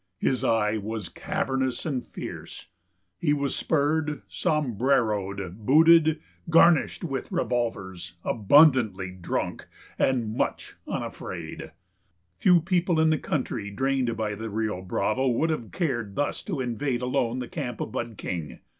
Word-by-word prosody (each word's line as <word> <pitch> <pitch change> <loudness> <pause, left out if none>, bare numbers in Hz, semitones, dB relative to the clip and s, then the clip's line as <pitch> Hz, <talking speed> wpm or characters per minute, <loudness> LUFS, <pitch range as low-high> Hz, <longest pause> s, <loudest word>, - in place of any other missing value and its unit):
His 130 +4 0
eye 110 -1 +2
was 110 -2 -4
cavernous 135 -10 -2
and 135 -6 -1
fierce. - - -8 0.5
He 150 -3 +2
was 140 -1 -1
spurred, 150 -3 0
sombreroed, 105 - 0
booted, 160 +4 +6 0.3
garnished 165 +2 +4
with 135 -1 -4
revolvers, 105 - -2
abundantly 110 - +4
drunk, 90 -1 -3 0.3
and 130 -3 +2
very 110 +1 -5
much - - -2
unafraid. 85 -3 -5 0.7
Few 180 -2 +5
people 175 -1 +1
in 160 0 +4
the 155 - +1
country 120 -7 -2
drained 130 +1 0
by 110 -2 -1
the 110 +2 -5
Rio 110 -3 -2
Bravo 110 +7 0
would 145 +7 +2
have 120 -8 -4
cared 120 - -2
thus 145 - -1
to 165 -10 -2
invade 125 +1 -2
alone 125 -1 0
the 125 -1 -4
camp 125 -8 -5
of - - -4
Bud 120 -2 -4
King. 80 -6 -5
125 Hz, 135 wpm, -26 LUFS, 105-150 Hz, 0.7 s, booted